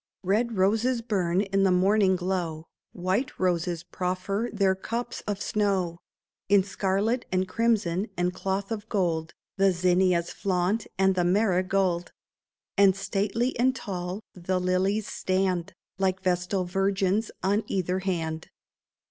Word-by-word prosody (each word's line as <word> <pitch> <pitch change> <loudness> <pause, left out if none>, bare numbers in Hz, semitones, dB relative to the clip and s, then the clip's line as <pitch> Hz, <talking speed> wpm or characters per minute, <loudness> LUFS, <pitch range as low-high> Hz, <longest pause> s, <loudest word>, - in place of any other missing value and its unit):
Red 215 +4 +1
roses 225 +6 +2
burn 190 -5 +1
in 195 -1 0
the 195 -1 +4
morning 190 +1 +4
glow; 175 -3 -2 0.3
White 190 +8 -1
roses 175 -2 0
proffer 185 +5 -2
their 195 -3 +2
cups 230 +5 -4
of 205 -1 -2
snow; 195 -6 0 0.5
In 200 -1 +5
scarlet 200 +5 0
and 185 0 +1
crimson 210 -3 +1
and 180 +1 0
cloth 195 +2 -3
of 210 -2 -4
gold 170 -5 -1 0.2
The 195 0 +4
zinnias 180 -1 +2
flaunt, 190 +3 0
and 190 0 +4
the 180 -1 +1
marigold; 185 -2 +1 0.6
And 195 -2 +5
stately 205 +5 -1
and 255 +2 +3
tall 185 -3 -4
the 185 +1 -1
lilies 185 +3 +1
stand. 185 -1 -1 0.3
Like 190 -1 0
vestal 180 +1 0
virgins, 195 +3 +1
on 205 +3 +2
either 185 -1 -1
hand. 165 -4 -3
190 Hz, 130 wpm, -27 LUFS, 180-205 Hz, 0.6 s, In